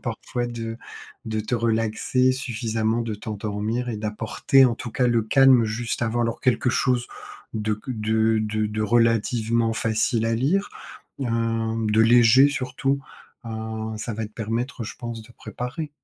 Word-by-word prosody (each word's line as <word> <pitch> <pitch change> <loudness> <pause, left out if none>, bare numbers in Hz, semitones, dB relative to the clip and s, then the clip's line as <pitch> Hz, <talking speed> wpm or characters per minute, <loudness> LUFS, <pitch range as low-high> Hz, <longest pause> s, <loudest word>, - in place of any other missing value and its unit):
parfois 120 +1 -3
de 115 -1 -5 0.5
de 110 -1 -2
te 110 +4 -2
relaxer 115 +3 +1
suffisamment. 115 -3 -1
De 115 -2 -3
t'endormir 105 +3 -3
et 115 - -3
d'apporter 110 +5 +2
en 120 -2 +3
tout 120 - -6
cas 125 -2 +2
le 115 -2 +2
calme 130 +1 +5
juste 115 +2 -3
avant. 120 +1 0
Alors 115 -1 -2
quelque 125 0 +2
chose 125 -1 +1 0.5
de 110 -1 -1
q 125 +4 -7
de 110 +1 +2
de 110 0 -1
de 105 +1 -3
relativement 115 0 +2
facile 115 +1 0
à 115 - +1
lire, 185 - +1 0.5
hem, 115 -2 -1
de 110 +1 +4
léger 120 +4 +6
surtout, 135 0 -1 0.5
heu, 110 0 -5
ça 115 - -4
va 110 0 -3
te 105 - -17
permettre 115 +3 -3
je - - -7
pense 120 -2 -6
de 120 +2 -17
préparer. 130 +7 -6
115 Hz, 155 wpm, -24 LUFS, 110-120 Hz, 0.5 s, léger